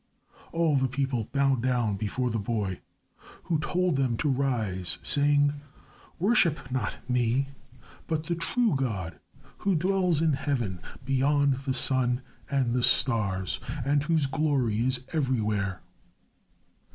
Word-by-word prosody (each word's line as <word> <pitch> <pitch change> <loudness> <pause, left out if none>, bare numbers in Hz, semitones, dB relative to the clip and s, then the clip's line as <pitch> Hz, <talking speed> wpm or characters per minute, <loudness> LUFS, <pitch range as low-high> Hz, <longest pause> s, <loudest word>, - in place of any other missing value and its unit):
All 165 -3 +2
the 130 0 +2
people 130 -3 -1
bowed 135 -3 +2
down 120 -4 +1
before 115 +5 -2
the 115 - -1
boy 100 -3 -2 0.6
who 160 -3 0
told 175 0 0
them 130 -4 +1
to 150 - 0
rise, 110 -10 -1
saying, 145 0 +3 0.6
"Worship 175 - +2
not 130 0 -1
me, 125 +2 +1 0.6
but 155 -1 -1
the 170 - -2
true 215 +7 +1
God 95 - -3 0.4
who 195 -2 +1
dwells 180 -1 +2
in 160 -1 +2
Heaven 120 - -2 0.2
beyond 140 +1 +2
the 135 0 -3
sun 130 -1 +2 0.3
and 130 -4 +1
the 125 - +1
stars 100 -8 +1 0.3
and 145 +1 +2
whose 160 -1 +1
glory 135 -6 0
is 125 +1 0
everywhere." 110 - 0
135 Hz, 130 wpm, -27 LUFS, 115-145 Hz, 0.6 s, saying